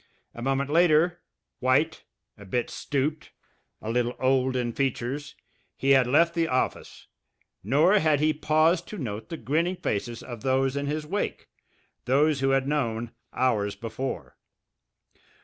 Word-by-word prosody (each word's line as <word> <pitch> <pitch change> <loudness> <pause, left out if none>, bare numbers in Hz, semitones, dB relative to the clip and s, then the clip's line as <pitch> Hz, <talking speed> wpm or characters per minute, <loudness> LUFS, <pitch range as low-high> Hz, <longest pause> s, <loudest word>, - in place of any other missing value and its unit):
A 120 - -9
moment 135 +2 0
later, 170 +1 +4 0.4
white, 140 +5 +1 0.3
a 100 - -13
bit 120 +5 -2
stooped, 145 +2 -2 0.5
a 110 - -2
little 120 +1 0
old 130 0 +2
in 120 -2 -1
features, 135 +3 -2 0.4
he 135 - +1
had 130 -2 +5
left 170 +6 +4
the 165 -1 +1
office, 130 -2 -2 0.6
nor 155 - +4
had 155 -2 +2
he 155 +1 +3
paused 155 +3 +2
to 210 - -7
note 110 - -5
the 165 - -5
grinning 160 +9 0
faces 115 - -3
of 120 -4 -8
those 135 0 +1
in 140 0 -2
his 150 +1 -2
wake, 200 +7 -3 0.6
those 145 +3 +3
who 135 0 +1
had 135 0 +2
known 120 -6 -1 0.2
hours 105 -6 0
before! 115 +4 -5
135 Hz, 145 wpm, -26 LUFS, 125-155 Hz, 0.6 s, had